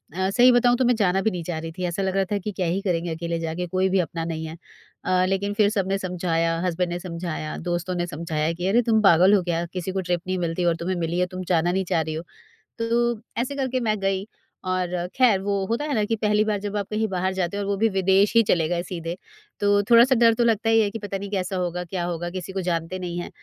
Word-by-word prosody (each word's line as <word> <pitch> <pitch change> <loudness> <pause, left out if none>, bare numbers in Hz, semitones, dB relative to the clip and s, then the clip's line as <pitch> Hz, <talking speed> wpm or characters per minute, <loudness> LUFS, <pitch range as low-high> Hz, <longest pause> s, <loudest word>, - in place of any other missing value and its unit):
अ, 190 +1 0
सही 245 +5 +6
बताऊँ 245 0 +4
तो 255 - +2
मैं 245 - +3
जाना 195 -3 +2
भी 220 - +1
नहीं 175 -2 -4
चाह 165 -1 -4
रही 165 0 -6
थी 185 - -4
ऐसा 175 +2 -2
लग 190 0 -1
रहा 195 0 +2
था 205 - +2
कि 200 +2 -4
क्या 185 -3 -2
ही 185 +4 0
करेंगे 175 -3 -1
अकेले 170 0 -3
जा 160 -1 -3
के 180 +1 -3
कोई 185 +2 +1
भी 190 0 +2
अपना 165 -1 -2
नहीं 160 -1 -4
है। 160 +1 -8 0.5
अ, 185 0 +2
लेकिन 195 +2 -1
फिर 210 -1 +3
सबने 195 -2 0
समझाया 170 -3 -1
हस्बैंड 180 0 -1
ने 175 - -3
समझाया, 170 -3 -5
दोस्तों 175 +1 -3
ने 175 0 -1
समझाया 155 -1 -2
कि, 175 +2 -3
"अरे, 230 +5 +4
तुम 220 -2 +2
पागल 185 0 +6
हो 200 - +5
क्या? 170 -1 -1
किसी 185 0 -3
को 190 0 -2
ट्रिप 175 -1 -1
नहीं 185 0 -1
मिलती 170 +1 -1
और 170 -1 +3
तुम्हें 170 +3 -3
मिली 170 +1 -1
है 180 - +3
तुम 185 - -4
जाना 170 +1 +2
नहीं 190 +1 0
चाह 165 - +3
रही 155 0 -4
हो।" 160 - -4 0.6
तो 235 0 0 0.2
ऐसे 280 +3 -3
करके 260 -2 -1
मैं 215 -4 0
गई 195 +1 -1 0.4
और 185 -1 -1 0.3
खैर 245 -7 +4
वो 200 0 -1
होता 235 +8 -1
है 295 - -2
ना 215 - +2
कि 225 - 0
पहली 210 -1 +2
बार 210 -2 0
जब 205 +1 -5
आप 200 - -2
कहीं 220 +1 0
बाहर 190 -1 -1
जाते 185 +1 -2
हो - - -2
और - - -4
वो 200 - 0
भी 225 +2 +3
विदेश 195 +1 +3
ही 230 - +8
चले 170 -6 +2
गए 175 0 -1
सीधे, 170 -1 -5 0.4
तो 205 0 +3
थोड़ा-सा 240 +3 +7
डर 230 -1 +5
तो 240 - +2
लगता 225 -1 +2
ही 225 - +5
है 210 - +1
कि 225 - -5
पता 200 -1 -4
नहीं 200 +1 -6
कैसा 190 -1 -2
होगा? 180 0 -2
क्या 175 +1 -4
होगा? 175 0 -3
किसी 185 +1 -6
को 190 - -2
जानते 175 0 -2
नहीं 175 -1 -4
हैं। - - -5
185 Hz, 270 wpm, -24 LUFS, 175-205 Hz, 0.6 s, ही